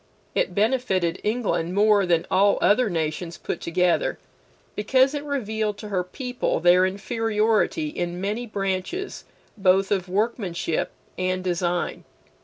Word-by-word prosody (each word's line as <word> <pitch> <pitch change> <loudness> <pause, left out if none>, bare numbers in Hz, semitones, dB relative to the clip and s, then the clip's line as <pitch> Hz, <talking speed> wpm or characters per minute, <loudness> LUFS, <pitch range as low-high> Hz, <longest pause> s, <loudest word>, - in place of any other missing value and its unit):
It - - 0
benefited 200 -6 +1
England 210 -6 -1
more 205 -2 +4
than 170 -2 +2
all 200 +2 +4
other 210 +5 +3
nations 165 0 -3
put - - -5
together, 175 +1 +1 0.6
because 260 +6 +3
it 290 -1 -3
revealed 220 -7 -2
to 210 0 -8
her 185 -3 0
people 250 +6 -2
their 180 +2 +5
inferiority 220 - 0
in 175 -9 -4
many 210 +5 -2
branches 200 - -3 0.3
both 195 +1 +3
of 190 -2 0
workmanship 190 -5 -1 0.3
and 185 0 -1
design. 175 -1 -1
200 Hz, 125 wpm, -24 LUFS, 180-225 Hz, 0.6 s, their